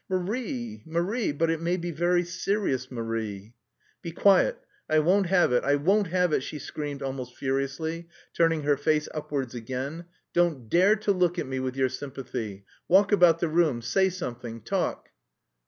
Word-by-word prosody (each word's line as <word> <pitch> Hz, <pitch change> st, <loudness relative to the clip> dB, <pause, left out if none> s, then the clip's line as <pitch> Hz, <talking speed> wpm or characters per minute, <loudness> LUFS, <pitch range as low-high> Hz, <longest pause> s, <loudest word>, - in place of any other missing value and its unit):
"Marie, 225 Hz, +5 st, -3 dB
Marie! 180 Hz, +8 st, 0 dB
But 160 Hz, +3 st, +1 dB
it 165 Hz, -1 st, -2 dB
may 175 Hz, +2 st, 0 dB
be 175 Hz, -1 st, -4 dB
very 175 Hz, +3 st, +2 dB
serious, 175 Hz, -, -1 dB
Marie!" 115 Hz, -3 st, -4 dB, 0.5 s
"Be 170 Hz, -, -5 dB
quiet... 200 Hz, -, +4 dB, 0.3 s
I 155 Hz, -, +3 dB
won't 180 Hz, +5 st, +3 dB
have 180 Hz, -8 st, +3 dB
it, 125 Hz, -, +2 dB
I 140 Hz, +1 st, +3 dB
won't 195 Hz, +8 st, +2 dB
have 180 Hz, -1 st, +1 dB
it," -, -, +3 dB
she 150 Hz, -, -6 dB
screamed 145 Hz, -2 st, -5 dB
almost 130 Hz, -2 st, -5 dB
furiously, 140 Hz, +5 st, -2 dB, 0.3 s
turning 165 Hz, -2 st, +2 dB
her 145 Hz, -1 st, +2 dB
face 150 Hz, +1 st, +1 dB
upwards 140 Hz, -4 st, -3 dB
again. 130 Hz, +8 st, -5 dB, 0.3 s
"Don't 160 Hz, -10 st, +1 dB
dare 190 Hz, +5 st, +5 dB
to 215 Hz, -1 st, 0 dB
look 180 Hz, -2 st, +1 dB
at 170 Hz, -, -1 dB
me 130 Hz, 0 st, -3 dB
with 130 Hz, 0 st, -3 dB
your 130 Hz, -1 st, +2 dB
sympathy! 125 Hz, -7 st, -6 dB, 0.2 s
Walk 195 Hz, +3 st, +5 dB
about 175 Hz, -5 st, +5 dB
the 170 Hz, -, +2 dB
room, 155 Hz, -7 st, +2 dB
say 190 Hz, +10 st, +2 dB
something, 120 Hz, -10 st, -6 dB
talk...." -, -, -2 dB
160 Hz, 170 wpm, -27 LUFS, 130-180 Hz, 0.5 s, dare